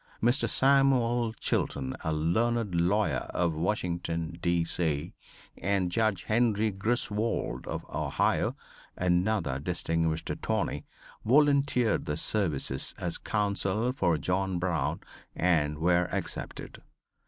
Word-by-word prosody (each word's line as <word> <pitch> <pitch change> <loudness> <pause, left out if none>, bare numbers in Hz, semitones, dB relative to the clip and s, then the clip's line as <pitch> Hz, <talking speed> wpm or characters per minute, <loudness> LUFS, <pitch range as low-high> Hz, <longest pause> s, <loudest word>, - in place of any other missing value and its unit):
Mr. 120 +5 +2
Samuel 130 -4 +3
Chilton 65 -10 -1
a 80 - -1
learned 105 +7 0
lawyer 90 +5 +1
of 85 -2 +1
Washington, 85 -1 -2
D. 85 -1 +1
C., 80 -2 -1 0.5
and 95 -1 0
Judge 110 -2 +1
Henry 110 -1 +2
Griswold 105 - -1
of - - -4
Ohio, - - 0 0.4
another 90 -5 +1
distinguished 80 0 -1
attorney, - - -2 0.4
volunteered 140 -3 +3
their 75 - -1
services 80 -9 0
as 90 -1 -3
counsel 105 +2 0
for 85 - +1
John 95 +2 -1
Brown 80 -4 -1 0.3
and 75 -4 +1
were 90 +2 +2
accepted. - - -5
90 Hz, 105 wpm, -29 LUFS, 85-110 Hz, 0.5 s, Samuel